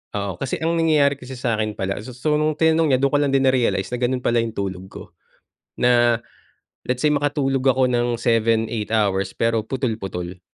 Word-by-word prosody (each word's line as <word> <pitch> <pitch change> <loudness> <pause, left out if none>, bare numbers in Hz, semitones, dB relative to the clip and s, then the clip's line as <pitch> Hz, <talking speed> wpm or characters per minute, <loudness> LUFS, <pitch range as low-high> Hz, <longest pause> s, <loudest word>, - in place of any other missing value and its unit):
Oo 100 -3 -3
kasi 135 - -3
ang 165 +1 +1
nangyayari 145 -4 +3
kasi 130 0 -9
sa'kin 110 -4 -2
pala 95 +1 -2
so 125 +1 -10
so 150 +4 0
nung 155 0 0
tinanong 160 -1 +2
niya - - 0
dun 140 - +3
ko 145 - +2
lang 145 -2 +1
din 135 - +3
na-realize 125 -6 +1
na 125 - -3
ganun 125 +1 -1
pala 120 0 +2
yung 115 -1 -5
tulog 95 -2 -4
ko, - - -9 0.8
na, 120 -1 +3 0.7
let's 125 0 0
say 150 - +4
makatulog 140 -2 0
ako 130 0 +4
ng 120 -1 0
7, 115 -1 +2
8 110 -3 -4
hours 100 -3 +1
pero 115 -1 +1
putol-putol. 95 -8 -4
120 Hz, 195 wpm, -21 LUFS, 110-135 Hz, 0.8 s, say